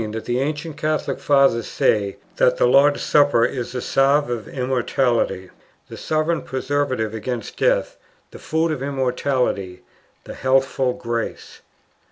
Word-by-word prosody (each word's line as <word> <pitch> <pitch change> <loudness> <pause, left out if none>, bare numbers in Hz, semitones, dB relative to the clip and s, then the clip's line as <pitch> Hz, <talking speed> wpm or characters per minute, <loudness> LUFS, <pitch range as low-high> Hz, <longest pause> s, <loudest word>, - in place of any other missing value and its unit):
That 110 - -5
the 120 +1 -1
ancient 150 +2 -3
Catholic 155 0 -2
Fathers 135 -5 +3
say 100 -2 0 0.2
that - - +3
the - - +3
"Lord's 140 +3 +4
Supper" 145 -5 +4
is 120 -1 -4
the 125 - -3
salve 140 0 +2
of 115 -3 -4
immortality, 125 -6 -1 0.4
the - - -8
sovereign 155 +1 -1
preservative 130 -3 -2
against 115 +1 -5
death, - - +1 0.3
the - - -11
food 160 +1 0
of 150 -4 -3
immortality, 130 -8 -1 0.4
the - - -9
healthful 130 -1 +1
grace. 115 -1 -5
130 Hz, 135 wpm, -21 LUFS, 120-145 Hz, 0.4 s, Lord's